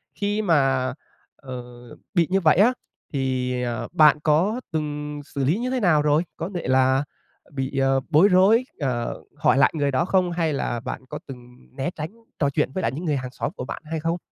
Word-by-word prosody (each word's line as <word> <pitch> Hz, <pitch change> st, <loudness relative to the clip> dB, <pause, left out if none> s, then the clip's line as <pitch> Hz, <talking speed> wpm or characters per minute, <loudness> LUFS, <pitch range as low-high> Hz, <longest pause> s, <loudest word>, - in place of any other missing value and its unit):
Khi 205 Hz, +1 st, -1 dB
mà, 135 Hz, -8 st, +2 dB, 0.4 s
ờ, 125 Hz, -2 st, -8 dB, 0.5 s
bị 170 Hz, -4 st, +3 dB
như 190 Hz, +1 st, +2 dB
vậy 160 Hz, -2 st, +4 dB
á 225 Hz, +7 st, +5 dB, 0.4 s
thì, 130 Hz, -2 st, -1 dB
ờ, 120 Hz, -2 st, -3 dB
bạn 150 Hz, -2 st, +6 dB
có 180 Hz, +11 st, +2 dB
từng 150 Hz, -1 st, -3 dB
xử 140 Hz, -2 st, -4 dB
lý 155 Hz, +9 st, +2 dB
như 245 Hz, +2 st, -2 dB
thế 260 Hz, 0 st, 0 dB
nào 175 Hz, -8 st, +3 dB
rồi? 150 Hz, +2 st, +3 dB
Có 165 Hz, +4 st, -4 dB
thể 175 Hz, -, -3 dB
là 130 Hz, +1 st, +3 dB, 0.5 s
bị, 135 Hz, 0 st, -3 dB
ờ, 135 Hz, 0 st, +3 dB
bối 165 Hz, +7 st, +6 dB
rối, 205 Hz, +6 st, +5 dB
ờ, 125 Hz, -5 st, -2 dB
hỏi 150 Hz, -3 st, +3 dB
lại 140 Hz, -, +5 dB
người 145 Hz, -2 st, +1 dB
đó 135 Hz, +6 st, +1 dB
không? 185 Hz, -1 st, +2 dB
Hay 165 Hz, -3 st, 0 dB
là 120 Hz, -3 st, -2 dB
bạn 115 Hz, -, -6 dB
có -, -, -5 dB
từng 125 Hz, -2 st, -11 dB, 0.2 s
né 135 Hz, +5 st, -2 dB
tránh 155 Hz, 0 st, -4 dB, 0.3 s
trò 140 Hz, -2 st, +2 dB
chuyện 135 Hz, -, 0 dB
với 185 Hz, -, -2 dB
lại 115 Hz, -, 0 dB
những 155 Hz, +8 st, -6 dB
người 150 Hz, -3 st, +1 dB
hàng 130 Hz, -1 st, -5 dB
xóm -, -, -3 dB
của 125 Hz, -, -5 dB
bạn -, -, -6 dB
hay 160 Hz, +1 st, -3 dB
không? 165 Hz, +2 st, -1 dB
150 Hz, 210 wpm, -24 LUFS, 130-170 Hz, 0.5 s, bạn